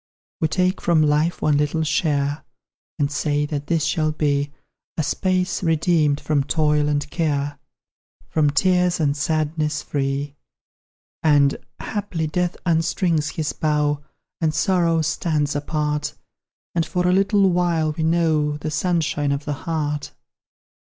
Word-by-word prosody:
We 160 - +2
take 185 +3 0
from 165 -3 +3
life 150 +3 +1
one 150 -1 +3
little 150 +2 0
share, 145 -2 0 0.5
And 145 -2 0
say 145 0 0
that 145 -1 -4
this 165 -2 +1
shall 155 0 +1
be 145 -2 0 0.5
A 160 - +1
space, 185 +4 0
redeemed 160 -3 +2
from 145 -3 0
toil 150 0 +1
and 145 -1 0
care, 145 -3 -1 0.7
From 155 -2 +2
tears 180 +3 +2
and 145 -3 +1
sadness 155 0 -1
free. 140 0 -2 0.9
And, 145 -3 +4 0.2
haply, 200 -6 -3
Death 175 +3 -1
unstrings 165 -2 +1
his 155 -3 -2
bow, 150 -1 0 0.4
And 155 -1 +1
Sorrow 170 -2 +2
stands 155 -2 0
apart, 150 0 -2 0.6
And, 170 - +1
for 180 +1 -1
a 180 - +3
little 195 0 +3
while, 170 -3 +1
we 155 - -5
know 160 -3 +2
The 155 +1 -4
sunshine 150 -3 0
of 140 +1 -2
the 150 - -1 0.2
heart. 150 -3 -2
155 Hz, 135 wpm, -22 LUFS, 145-165 Hz, 0.9 s, And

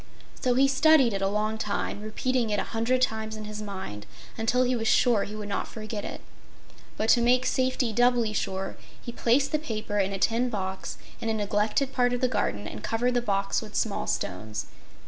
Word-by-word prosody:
So 250 -1 +2
he 270 +2 +5
studied 270 -3 +5
it 195 - -2
a 195 - +2
long 215 +2 -1
time, 205 -1 -2
repeating 235 +2 -1
it 205 -1 +1
a - - 0
hundred 245 +3 +2
times 220 -2 -1
in 215 - -7
his 210 0 -6
mind 190 - -6 0.3
until 235 +3 +2
he 255 0 +1
was 225 -1 -1
sure 230 -4 +4
he 210 - -7
would 210 -1 -5
not 200 - -2
forget 215 -1 -6
it. - - -6 0.8
But 215 - 0
to 240 - +6
make 250 +1 +3
safety 255 -3 +1
doubly 240 -1 +3
sure 195 -2 -2 0.2
he 240 - -7
placed 245 +4 +2
the 305 - +1
paper 215 -7 -3
in 195 0 +1
a 195 - -2
tin 230 +6 +1
box 190 -4 -4 0.2
in 225 - -2
a 220 - +1
neglected 210 +6 0
part 245 0 +2
of 245 - -2
the 255 - +4
garden 105 - -1
and 105 - -7
covered 245 +2 0
the 245 - +2
box 195 -3 0
with 215 -2 -10
small 215 -3 -1
stones. 105 +4 -3
220 Hz, 205 wpm, -27 LUFS, 205-245 Hz, 0.8 s, to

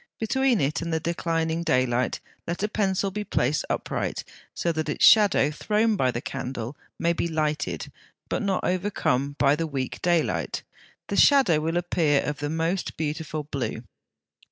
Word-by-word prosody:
Between 260 +1 +2
it 145 +3 0
and 170 0 -3
the 160 - +1
declining 165 0 -1
daylight 130 -5 +1 0.3
let 175 +3 -3
a - - +2
pencil 195 -2 0
be 210 +2 -3
placed 145 -6 0
upright, - - -2 0.3
so 170 - 0
that 155 -1 -2
its - - +3
shadow 205 -8 +6
thrown 215 +7 +1
by 130 -9 +2
the 120 -1 -3
candle 125 0 -5 0.2
may 170 0 +1
be 170 - -1
lighted, 155 -2 -2 0.4
but - - -1
not 195 -3 0
overcome, 145 -8 0
by 140 0 +4
the 165 +1 -2
weak 135 -4 -4
daylight: 175 -2 0 0.5
the - - -1
shadow 265 - +5
will 165 +2 -1
appear 165 -4 +2
of 150 0 -3
the 145 0 -2
most 165 +4 -2
beautiful 155 0 -3
blue. 140 -5 -4
160 Hz, 160 wpm, -25 LUFS, 145-185 Hz, 0.5 s, shadow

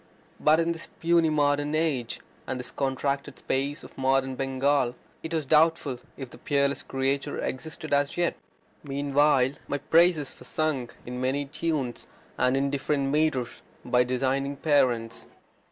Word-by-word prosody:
But 155 +1 +4
in 165 0 +1
this 165 0 -6
puny 170 -1 +3
modern 145 0 +1
age, 145 -7 -1 0.3
and 130 - -2
this 125 - -6
contracted 140 +1 -2
space 140 +3 -2
of - - -13
modern 135 0 +2
Bengal, 135 -1 +1 0.3
it 160 - -6
was 160 -3 -1
doubtful 155 -3 +3 0.2
if 130 -3 -7
the - - -13
peerless 140 -1 +1
creature 135 +1 -1
existed 155 +3 -4
as 140 +2 +1
yet. 175 -1 +1 0.5
Meanwhile 140 -1 +2 0.2
my 145 - -1
praises 160 0 +3
were - - -12
sung 150 -6 -1 0.2
in 125 +1 -5
many 135 +3 0
tunes, 145 -4 -3 0.3
and 130 +1 +2
in 140 0 +1
different 140 0 0
metres, 145 -5 0 0.2
by 125 0 +3
designing 135 +3 0
parents. 125 -7 +1
140 Hz, 145 wpm, -27 LUFS, 130-155 Hz, 0.5 s, But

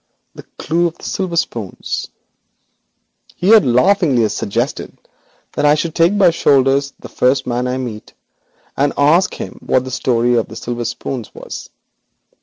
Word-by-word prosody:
The - - -10 0.2
clue 170 +3 +1
of 170 0 -8
the - - -19
silver 185 -3 -3
spoons! 115 - -3 1.3
He 180 - -1
had 220 -1 +7
laughingly 125 - +3
suggested 115 +7 -3 0.5
that - - -3
I 150 0 +5
should 160 +1 -2
take 170 +5 +3
by 195 -3 +6
the - - +1
shoulders 140 -2 +2
the - - -10
first 130 +1 +1
man 125 0 -1
I 125 +1 -2
met, 120 -5 -7 0.6
and 140 +1 +1
ask 160 +6 +3
him - - -8
what 130 - +1
the 130 - -7
story 120 -1 +1
of 115 - 0
the 110 - -11
silver 120 +1 -4
spoons 120 0 -5
was. - - -8
135 Hz, 160 wpm, -17 LUFS, 120-165 Hz, 1.3 s, had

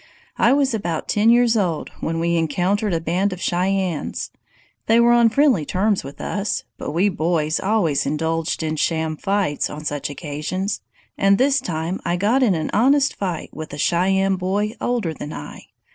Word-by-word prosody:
"I 235 - +5
was 275 -2 +2
about 170 -7 -3
ten 215 +2 +3
years 240 -1 +4
old 180 -7 -1
when 165 0 -2
we 170 +1 +1
encountered 180 +6 0
a 165 - +1
band 180 +5 0
of 185 - -6
Cheyennes. 185 -2 -1 0.6
They 225 +1 +5
were 235 0 +5
on 235 -1 +5
friendly 255 - +3
terms 195 +6 0
with 140 +1 -10
us, 205 0 -2 0.2
but - - -4
we 170 +7 +2
boys 160 -4 0
always 185 -10 +1
indulged 160 +2 -1
in 155 0 -2
sham 160 0 0
fights 195 -3 -1
on 150 +1 -8
such 145 -2 -2
occasions, 155 +7 -4 0.4
and 195 0 +4
this 275 +2 +3
time 170 -4 -3
I 175 - 0
got 220 +8 +2
in 220 -8 +3
an 160 -1 -3
honest 275 +4 +3
fight 180 -5 -4
with 155 -1 -8
a - - -5
Cheyenne 190 +4 +2
boy 200 +3 -1
older 235 -10 -1
than 150 0 -7
I. 75 - -9
185 Hz, 175 wpm, -21 LUFS, 160-210 Hz, 0.6 s, I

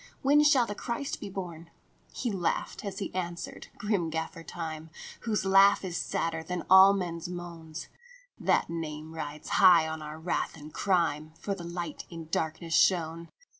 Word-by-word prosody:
When 290 +2 +5
shall 280 -5 +5
the 205 - -4
Christ 235 +6 -4
be - - -5
born? 170 -4 -7 0.2
" - - -37
He 245 - -2
laughed 185 -4 -2
as 200 -2 -5
he 200 - -4
answered, 175 -2 -5
grim 205 -5 0
Gaffer 160 +1 -4
Time, 160 -1 -6 0.4
Whose 215 -4 0
laugh 195 +1 +6
is 175 -2 -4
sadder 165 -2 -1
than 175 +1 -4
all 190 +1 +9
men 180 -4 -2
s 170 +1 -6
moan. 170 -3 -8 0.3
" - - -24
That - - +4
name 160 -1 -5
rides 150 -1 -6
high 175 -4 +8
on 160 0 -5
our 150 +1 -7
wrath 165 0 -2
and 150 0 -11
crime, 160 -5 0
For 200 - -2
the 185 -3 -7
Light 170 0 -5
in 165 -2 -8
darkness 160 +1 -2
shone. 165 -2 +2
170 Hz, 175 wpm, -29 LUFS, 160-195 Hz, 0.4 s, all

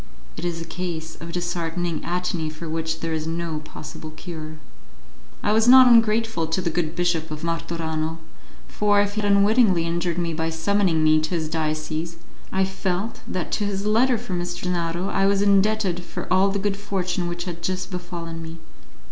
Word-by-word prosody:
It 160 - -7
is 170 -1 -2
a 165 - -6
case 165 -3 -5
of 170 0 -7
disheartening 175 -1 -2
atony 175 -2 -1
for 155 +2 -8
which 160 0 -2
there 165 -1 -2
is 160 0 -2
no 165 -1 -2
possible 155 +1 -9
cure. 155 -1 -8 0.9
I 210 - +2
was 220 +1 +4
not 260 +1 +10
ungrateful 225 -6 +4
to 160 +3 0
the 175 -2 -1
good 160 -1 -1
Bishop 175 -2 0
of 155 +1 -6
Martorano, 165 -1 -2 0.5
for, 205 -1 +2
if 205 0 +1
he 215 - -1
had 205 -1 +2
unwittingly 200 -3 +4
injured 170 0 -1
me 170 -2 -1
by 160 0 -1
summoning 165 0 +1
me 155 0 +5
to 155 0 -2
his 160 -2 -1
diocese, 155 +1 -2 0.3
I 190 0 +2
felt 190 +2 -3
that 185 - -3
to 210 - 0
his 200 0 -2
letter 235 +4 +3
for 215 -4 -6
M. 175 -1 -1
Gennaro 175 0 -2
I 195 0 +2
was 200 0 +3
indebted 200 -2 +2
for - - -6
all 190 +1 +4
the 200 - -1
good 200 0 -1
fortune 185 -3 -2
which 175 0 -3
had 170 -2 -6
just 185 +1 -2
befallen 170 -2 -5
me. 165 0 -8
175 Hz, 185 wpm, -24 LUFS, 165-195 Hz, 0.9 s, not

